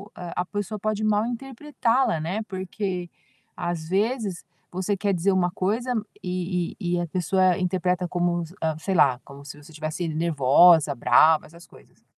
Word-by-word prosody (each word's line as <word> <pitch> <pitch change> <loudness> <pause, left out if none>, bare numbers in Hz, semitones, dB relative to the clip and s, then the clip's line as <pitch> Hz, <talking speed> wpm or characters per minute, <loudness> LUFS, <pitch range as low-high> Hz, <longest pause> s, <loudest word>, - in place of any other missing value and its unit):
a 180 0 -4
pessoa 205 +2 -4
pode 215 +1 -2
mal 215 0 +2
interpretá-la, 245 - -1
né. 185 +7 -2
Porque 185 -1 -4 0.6
às 160 -2 -4
vezes 205 -2 -1 0.3
você 185 +3 -1
quer 200 0 0
dizer 185 +2 +1
uma 180 -2 +1
coisa 230 +6 0 0.3
e 180 -1 -2
e 175 -2 -1
e - - 0
a 170 - -3
pessoa 185 +1 +2
interpreta 180 0 0
como, 175 0 0 0.4
sei 190 -2 0
lá, 145 -4 +6 0.2
como 140 0 -12
se 145 - -9
você 160 +2 -15
estivesse 155 +3 -4 0.2
nervosa, 150 0 +5
brava, 155 +5 +4
essas 170 +2 -16
coisas. - - -21
180 Hz, 155 wpm, -24 LUFS, 170-205 Hz, 0.6 s, lá